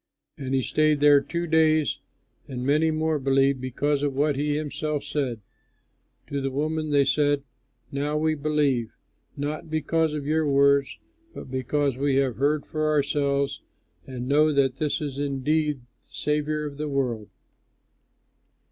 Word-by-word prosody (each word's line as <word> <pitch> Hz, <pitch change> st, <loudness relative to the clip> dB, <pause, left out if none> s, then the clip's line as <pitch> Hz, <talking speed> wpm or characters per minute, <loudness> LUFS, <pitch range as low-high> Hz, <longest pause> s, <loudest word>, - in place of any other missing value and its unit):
And 135 Hz, -1 st, -3 dB
he 130 Hz, -, +1 dB
stayed 155 Hz, +1 st, +2 dB
there 145 Hz, -1 st, +6 dB
two 170 Hz, +4 st, -3 dB
days, 155 Hz, -2 st, +2 dB, 0.5 s
and 125 Hz, -2 st, -5 dB
many 155 Hz, +3 st, +3 dB
more 155 Hz, -1 st, 0 dB
believed 135 Hz, 0 st, +2 dB
because 140 Hz, +3 st, -1 dB
of 145 Hz, -2 st, -1 dB
what 145 Hz, +1 st, +1 dB
he 145 Hz, +1 st, 0 dB
himself 150 Hz, -1 st, -3 dB
said. 135 Hz, -6 st, -3 dB, 0.8 s
To 140 Hz, -1 st, -3 dB
the 135 Hz, -, -1 dB
woman 155 Hz, +3 st, -2 dB
they 140 Hz, -1 st, +3 dB
said, 145 Hz, 0 st, +2 dB, 0.5 s
"Now 145 Hz, +2 st, -1 dB
we 155 Hz, +1 st, +1 dB
believe, 145 Hz, -6 st, 0 dB, 0.4 s
not 150 Hz, +2 st, -4 dB
because 155 Hz, 0 st, 0 dB
of 145 Hz, -2 st, -4 dB
your 155 Hz, +1 st, +1 dB
words 140 Hz, 0 st, +3 dB, 0.4 s
but -, -, -9 dB
because 135 Hz, +1 st, 0 dB
we 140 Hz, 0 st, +1 dB
have 135 Hz, -3 st, +1 dB
heard 145 Hz, +3 st, +1 dB
for 155 Hz, 0 st, -1 dB
ourselves 140 Hz, -1 st, 0 dB, 0.5 s
and 125 Hz, -1 st, -6 dB
know 150 Hz, +3 st, +4 dB
that 135 Hz, -2 st, +1 dB
this 150 Hz, +1 st, -1 dB
is 140 Hz, -2 st, -4 dB
indeed 145 Hz, +1 st, 0 dB
the 120 Hz, 0 st, -28 dB
Saviour 150 Hz, 0 st, -1 dB
of 145 Hz, -1 st, -7 dB
the 150 Hz, 0 st, -3 dB
world." 125 Hz, -6 st, -2 dB
145 Hz, 150 wpm, -25 LUFS, 135-150 Hz, 0.8 s, there